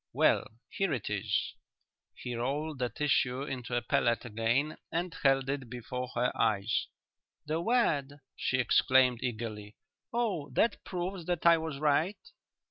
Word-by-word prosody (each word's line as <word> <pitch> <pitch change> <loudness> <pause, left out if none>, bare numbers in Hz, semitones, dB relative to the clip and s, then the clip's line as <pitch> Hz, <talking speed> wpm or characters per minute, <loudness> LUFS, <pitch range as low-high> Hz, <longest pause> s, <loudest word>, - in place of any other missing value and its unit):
Well, - - +3 0.2
here 195 -3 -1
it 115 -5 -3
is." 105 0 -1 0.6
He 125 - -6
rolled 140 +5 -2
the 125 -1 0
tissue 135 -2 +1
into 125 -3 -4
a 120 - 0
pellet 120 -1 +1
again 120 +7 0
and 170 +1 -2
held 135 -1 +3
it 135 -3 -3
before 125 +1 -5
her 120 +1 +2
eyes. 105 -3 +1 0.6
"The 155 +2 -1
wad!" 165 - +2 0.2
she 130 - 0
exclaimed 130 0 +4
eagerly. 110 -4 -4 0.4
"Oh, 205 -11 -1
that 230 - +1
proves 180 -1 -4
that 175 -2 -1
I 170 -1 +7
was 160 -3 -4
right?" 155 +7 +2
135 Hz, 140 wpm, -31 LUFS, 120-160 Hz, 0.6 s, I